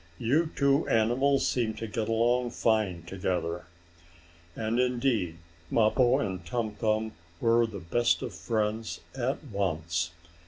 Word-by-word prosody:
"You 150 +8 +2
two 140 +1 +3
animals 125 +5 +3
seem 115 -3 0
to 115 - -5
get 110 0 -3
along 120 +2 +2
fine 110 -8 0
together!" 90 -2 -2 0.9
And 115 +2 -1
indeed 120 -9 +1 0.3
Mappo 120 +3 +4
and 95 -8 -3
Tum 110 +5 -2
Tum 110 0 0 0.3
were 115 0 +3
the 110 -3 -7
best 120 +8 +1
of - - -5
friends 110 0 -2
at 130 +3 -2
once. 85 - -1
115 Hz, 125 wpm, -29 LUFS, 100-120 Hz, 0.9 s, Mappo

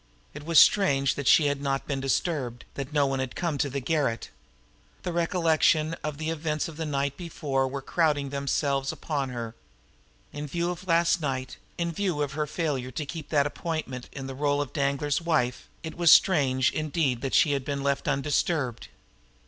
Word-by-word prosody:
It 150 - -8
was 165 -3 +6
strange 140 -10 +4
that 140 - -4
she 155 - +6
had 145 -1 0
not 135 -1 -1
been 140 -2 -2
disturbed, 135 -3 -1
that 140 0 -5
no 145 -1 +3
one 135 -1 -1
had 130 -2 -3
come 165 -5 -2
to 140 - +1
the 140 +1 -3
garret! 135 -5 -1 0.7
The 175 - -3
recollection 165 -2 +2
of 150 -2 -3
the 155 +1 -2
events 155 -1 -2
of 165 - -9
the 160 0 -4
night 140 -1 -1
before 140 -6 -1
were 135 +1 -5
crowding 150 -3 +1
themselves 140 0 0
upon 140 -4 -3
her 115 -2 -5 0.8
now. 145 - -6
In 150 - -4
view 170 +4 -1
of 180 +2 -8
last 170 0 +3
night, 130 -3 -3 0.2
in 170 0 -1
view 170 -4 -1
of 140 - -3
her 150 +1 -2
failure 145 -5 -2
to 130 +4 -4
keep 155 +1 -7
that 145 -3 +3
appointment 145 -5 -4
in 135 - -7
the 135 - -5
role 145 +1 0
of 145 -3 -3
Danglar's 140 +1 0
wife, 150 -7 0 0.2
it 160 - -5
was 170 -1 +3
very - - +11
strange 135 -7 +1
indeed 150 -5 -1
that 135 - -1
she 150 - +5
had 140 -2 0
been 140 0 -3
left 140 0 0
undisturbed! 135 - 0
145 Hz, 195 wpm, -27 LUFS, 135-160 Hz, 0.8 s, very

